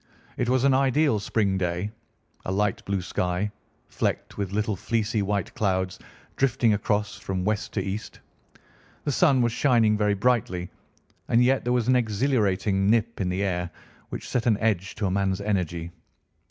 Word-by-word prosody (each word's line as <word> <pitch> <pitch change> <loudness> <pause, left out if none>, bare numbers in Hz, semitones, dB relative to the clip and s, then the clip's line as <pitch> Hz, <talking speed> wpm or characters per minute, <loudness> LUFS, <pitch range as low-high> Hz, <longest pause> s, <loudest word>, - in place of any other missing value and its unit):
It 125 - -1
was 130 0 +2
an 140 -1 +5
ideal 135 -2 +3
spring 100 -2 0
day, 90 +3 -2 0.5
a - - -3
light 100 0 0
blue 100 -2 -1
sky, 90 +3 -1 0.4
flecked - - -2
with 100 -2 -3
little 105 +1 0
fleecy 110 +2 -1
white 100 -1 -1
clouds 95 -4 -1 0.4
drifting 125 -4 +3
across 105 0 -1
from 95 -1 -3
west 105 0 -1
to 95 - -1
east. 100 +3 -5 0.8
The 145 - 0
sun 135 -4 +4
was 120 - +1
shining 115 -4 +3
very 105 -1 +1
brightly, 105 -5 0 0.6
and 120 +1 +4
yet 130 +2 +2
there 120 - -1
was 125 -2 +1
an 130 - +4
exhilarating 105 -5 +1
nip 115 0 +1
in 90 - 0
the 95 +2 -1
air, 90 -3 -1 0.4
which - - -6
set 125 0 -1
an 110 -3 +4
edge 105 -4 0
to 105 - -2
a 95 - 0
man's 95 0 0
energy. 90 -5 -2
105 Hz, 165 wpm, -26 LUFS, 95-120 Hz, 0.8 s, an